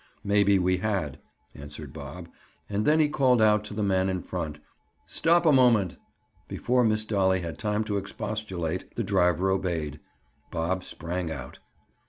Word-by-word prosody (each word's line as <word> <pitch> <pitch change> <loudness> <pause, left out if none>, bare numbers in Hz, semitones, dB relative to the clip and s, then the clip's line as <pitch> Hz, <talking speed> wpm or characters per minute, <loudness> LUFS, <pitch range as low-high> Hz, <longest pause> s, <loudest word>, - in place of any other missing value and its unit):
"Maybe 100 -1 +4
we 90 0 +2
had," 95 -8 -2 0.3
answered 75 -1 -9
Bob. 75 +5 -8 0.4
And 105 +1 -1
then 155 +1 +5
he 155 - +5
called 130 -4 +3
out 105 -1 +4
to 105 - -8
the 105 - -1
man 95 -1 +2
in 95 -1 -2
front. 80 -5 -4 0.5
"Stop 170 +1 +2
a 155 - +6
moment." 120 - +4 0.5
Before 125 0 +1
Miss 110 -1 +2
Dolly 95 -3 +2
had 85 -3 -6
time 105 0 0
to 105 -1 -2
expostulate, 95 -3 -4
the 115 - -1
driver 95 -1 +2
obeyed. 85 -6 -2 0.5
Bob 90 +3 -2
sprang 85 +1 -4
out. 65 -4 -7
95 Hz, 155 wpm, -27 LUFS, 85-110 Hz, 0.5 s, a